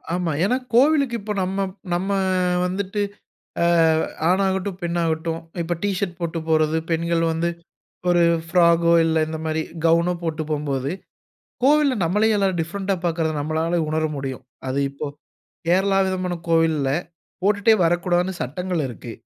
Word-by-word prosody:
ஆமா. 175 -2 -1
ஏன்னா 245 +7 +2 0.2
கோவிலுக்கு 275 0 +4
இப்ப 210 +1 -5
நம்ம 195 +1 -1 0.3
நம்ம 180 +3 -1 0.6
வந்துட்டு 195 +2 -2 0.6
அ - - +3 0.6
ஆணாகட்டும், 190 0 0
பெண்ணாகட்டும் 165 -1 -1 0.2
இப்ப 170 +1 -2
டீ 205 - +2
ஷர்ட் 185 -3 -3
போட்டு 170 -1 -2
போறது, 155 0 +2
பெண்கள் 165 0 +1
வந்து 165 +1 0 0.6
ஒரு 175 -1 +4 0.3
ஃப்ராகோ, 170 -1 +4
இல்ல 160 0 +1
இந்த 160 0 -4
மாரி 160 0 0 0.2
கவுனோ 170 +2 +3
போட்டு 160 -1 -2
போகும்போது, 140 -2 -2 0.7
கோவில்ல 290 -1 +4
நம்மளே 210 +6 +2
எல்லாரும் 195 -3 +1
டிஃபரண்ட்‌டா 190 +4 -2
பார்க்குறத 165 -2 0
நம்மளால 160 +3 0
உணர 155 +1 0
முடியும். 135 -2 -5 0.2
அது 130 +2 -1
இப்போ 140 +2 -6 0.6
கேரளா 195 +2 +3
விதமான 185 -1 -2
கோவில்ல, 165 -4 +2 0.5
போட்டுட்டே 205 +2 +4
வரக்கூடாதுன்னு 175 +2 +1
சட்டங்கள் 175 +5 -2
இருக்கு. 120 -1 -8
170 Hz, 130 wpm, -22 LUFS, 160-190 Hz, 0.7 s, கோவிலுக்கு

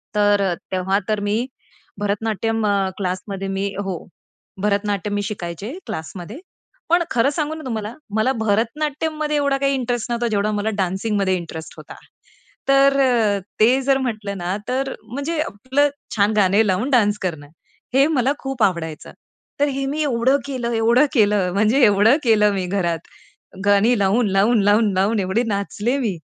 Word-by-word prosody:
तर 205 -1 +3
अ, 190 -3 +1 0.2
तेव्हा 190 +2 +1
तर 215 -1 +1
मी 210 +4 0 0.5
भरतनाट्यम 220 +2 -1
अ, 195 -2 +1
क्लासमध्ये 195 +1 -4
मी 195 +1 -2 0.2
हो. 185 -4 -4 0.6
भरतनाट्यम 205 0 0
मी 205 - 0
शिकायचे 200 - -5
क्लासमध्ये, 195 - -7 0.5
पण 345 0 +4
खरं 245 +3 +3
सांगू 305 +1 -2
ना 315 - -9
तुम्हाला 220 -2 -4 0.2
मला 220 +5 +2
भरतनाट्यममध्ये 300 +8 -1
एवढा 280 -1 +1
काही 275 0 +1
इंटरेस्ट 245 -2 -2
नव्हता 235 0 0
जेवढा 210 0 0
मला 210 +1 -1
डान्सिंगमध्ये 190 +1 0
इंटरेस्ट 160 -2 -8
होता. - - -11 0.7
तर 275 0 +5
अ, 230 -6 +2 0.2
ते 250 +5 +4
जर 270 0 +2
म्हटलं 215 -6 -3
ना, 180 +2 -2
तर 265 +1 -1
म्हणजे 285 +7 -4
आपलं 265 +3 0 0.3
छान 205 +1 +2
गाणे 200 +2 +4
लावून 195 +9 0
डान्स 210 -4 +3
करणं. 160 -6 -4 0.5
हे 275 +3 +5
मला 270 -4 +1
खूप 270 -4 -2
आवडायचं. 165 -4 -1 0.5
तर 290 - +3
हे 275 0 -2
मी 295 +3 -2
एवढं 260 0 +2
केलं 250 -4 -3
एवढं 235 +5 +4
केलं 205 -6 +3
म्हणजे 215 +7 +2
एवढं 210 +7 +5
केलं 210 -3 +4
मी 190 -2 -2
घरात. 175 -4 -1 0.7
गाणी 205 +4 +4
लावून, 200 +3 +2
लावून, 205 +3 +3
लावून, 205 +1 +3
लावून 200 +3 +1
एवढे 195 +6 0
नाचले 210 +5 -1
मी 220 -7 -1
215 Hz, 155 wpm, -21 LUFS, 200-260 Hz, 0.7 s, तर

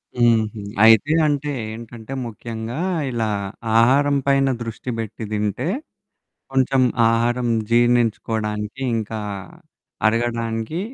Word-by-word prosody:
హుహు. 115 -3 +2 0.2
అయితే 115 +7 +6
అంటే 145 0 0 0.2
ఏంటంటే 115 +2 -9
ముఖ్యంగా 115 +1 -6 0.3
ఇలా 115 -3 -1 0.5
ఆహారం 140 +5 +4
పైన 135 -1 +3
దృష్టి 115 +2 -6
బెట్టి 110 0 -5
దింటే, 105 - -1 0.9
కొంచెం 130 0 +3 0.3
ఆహారం 120 +2 +1 0.2
జీర్ణించుకోడానికి 115 -1 +1
ఇంకా, 110 0 -3 0.9
అరగడానికి 115 +5 -1
115 Hz, 90 wpm, -21 LUFS, 110-125 Hz, 0.9 s, అయితే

